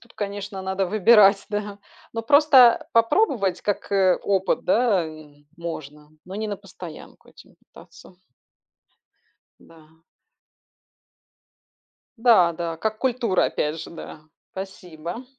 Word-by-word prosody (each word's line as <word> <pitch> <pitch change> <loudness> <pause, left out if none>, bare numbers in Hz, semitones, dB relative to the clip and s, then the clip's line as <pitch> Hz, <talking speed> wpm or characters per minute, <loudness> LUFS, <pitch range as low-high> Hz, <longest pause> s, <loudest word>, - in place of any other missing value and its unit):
Тут, 235 +1 -21
конечно, 200 -1 -6
надо 190 0 -2
выбирать, 205 0 +5
да. 205 -1 -4 0.4
Но 225 - -3
просто 265 -2 +5
попробовать, 230 - +1
как, 205 0 -3
э, 190 -2 +3
опыт, 195 -1 0
да, 210 -4 +2
м, 150 -2 -14
можно, 150 -3 -8 0.2
но 185 - -10
не 215 0 -4
на 205 - -4
постоянку 185 -4 -13
этим - - -19
питаться. 180 - -18 1.4
Да. 160 0 -21 2.2
Да, 225 -8 +4
да, 165 0 -5
как 215 +5 -3
культура, 240 -7 0
опять 155 +2 -3
же, - - -9
да. 165 -2 -10 0.3
Спасибо. 180 +2 -8
195 Hz, 115 wpm, -23 LUFS, 170-220 Hz, 2.2 s, выбирать